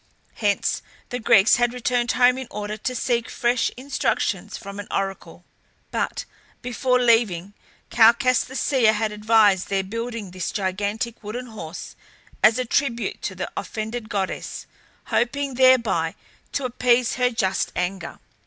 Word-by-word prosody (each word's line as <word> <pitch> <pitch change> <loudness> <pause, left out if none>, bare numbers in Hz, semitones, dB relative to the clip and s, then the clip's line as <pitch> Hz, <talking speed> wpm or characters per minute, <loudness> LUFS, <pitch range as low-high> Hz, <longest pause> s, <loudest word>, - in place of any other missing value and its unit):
Hence 205 -2 0 0.3
the 245 - -3
Greeks 215 -2 +5
had 240 0 +1
returned 245 0 0
home 250 +1 +4
in 260 - -6
order 210 0 -4
to 255 +4 -4
seek 235 -1 0
fresh 240 0 +1
instructions 270 +2 -1
from 200 -1 -9
an 205 - -6
oracle. 195 -1 -4 0.5
But - - -2 0.4
before 250 +1 +1
leaving, 220 -6 +2 0.4
Calchas 240 +2 +5
the 265 - -10
seer 250 -6 +3
had 215 0 -1
advised 210 -3 +3
their 195 -1 0
building 230 0 -5
this 185 -1 -4
gigantic 205 +4 -3
wooden 235 +5 -5
horse 190 -8 -8 0.5
as 220 +2 +5
a 255 - -1
tribute 240 -1 -1
to - - -4
the - - -5
offended 220 0 -5
goddess, 195 -2 -3 0.5
hoping 275 +3 0
thereby 235 -11 +3 0.4
to 280 - -1
appease 245 -1 +2
her 250 -1 +3
just 195 -5 -1
anger. 180 -1 -3
230 Hz, 140 wpm, -23 LUFS, 205-245 Hz, 0.5 s, Greeks